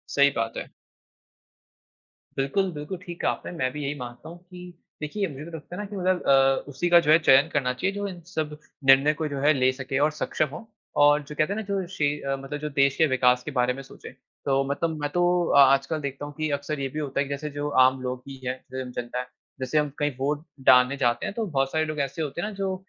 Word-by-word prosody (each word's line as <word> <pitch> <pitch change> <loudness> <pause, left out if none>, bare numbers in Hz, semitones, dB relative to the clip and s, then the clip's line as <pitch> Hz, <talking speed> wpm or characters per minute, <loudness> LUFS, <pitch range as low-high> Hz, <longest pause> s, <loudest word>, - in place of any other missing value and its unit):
सही 140 0 +6
बात 115 0 -2
है। - - -6 1.7
बिल्कुल 185 +8 0
बिल्कुल 150 +4 -6
ठीक 175 -1 -7
कहा - - +2
आपने, - - -7
मैं 130 -7 -1
भी 150 -1 -5
यही 140 +1 -2
मानता 120 +5 -8
हूँ 170 - -10
कि 180 0 -12 0.3
देखिए 195 +6 -2
मुझे 145 0 -8
तो 170 - -10
लगता 165 +4 -10
है 205 - -4
ना - - -5
कि 205 - -7
मतलब 185 -1 +1
अ, 135 0 +4
उसी 160 +6 -2
का 175 0 +8
जो 155 -2 +2
है 160 - +8
चयन 135 0 +5
करना 125 -3 +1
चाहिए 190 +10 -2
जो 205 0 -2
इन 180 -2 -7 0.2
सब 150 -1 -2 0.3
निर्णय 135 +3 +7
को 155 0 -3
जो 140 -2 -4
है 150 +2 +4
ले 130 -1 +3
सके 130 0 -4
और 155 - +1
सक्षम 155 0 -1
हो 225 - -9 0.4
और 145 +1 +5
जो 150 +1 -10
कहते 155 +7 +1
है - - -4
ना - - -2
जो 195 -2 -1
शे 155 -6 0 0.3
मतलब 135 +2 -6
जो 150 0 -4
देश 140 -1 +2
के 160 - +5
विकास 125 -1 +3
के 150 - -5
बारे 125 -1 +1
में 135 - -8
सोचे। - - -12 0.4
तो 135 0 +2
मतलब 160 +2 -1
मैं 145 - -1
तो 175 +3 +1 0.3
आ 140 -1 +8
आजकल 140 +3 -1
देखता 140 +1 -5
हूँ 145 - -8
कि 155 -1 -1
अक्सर 145 +1 -3
ये 135 - -1
भी 155 - -5
होता 140 -2 -3
है 140 - +2
कि - - -10
जैसे 150 +2 -4
जो 145 +1 -3 0.2
आम 130 0 +1
लोग 125 0 -3
भी 135 - -7
है, 130 - 0 0.2
स्वयं 130 -1 -5
जनता 125 0 -4
है, 125 - -5 0.3
जैसे 130 +4 -1
हम 150 -1 +2
कहीं 145 0 +1
वोट 145 +4 -2 0.2
डालने 125 +2 +6
जाते 120 -2 +1
है - - -2
तो 225 +1 -3
बहुत 135 -6 0
सारे 155 0 +1
लोग 155 -1 -4
ऐसे 140 +3 -2
होते 155 +3 -3
हैं 210 - -2
ना 215 - -6
जो 195 -1 -2
145 Hz, 255 wpm, -25 LUFS, 135-160 Hz, 1.7 s, का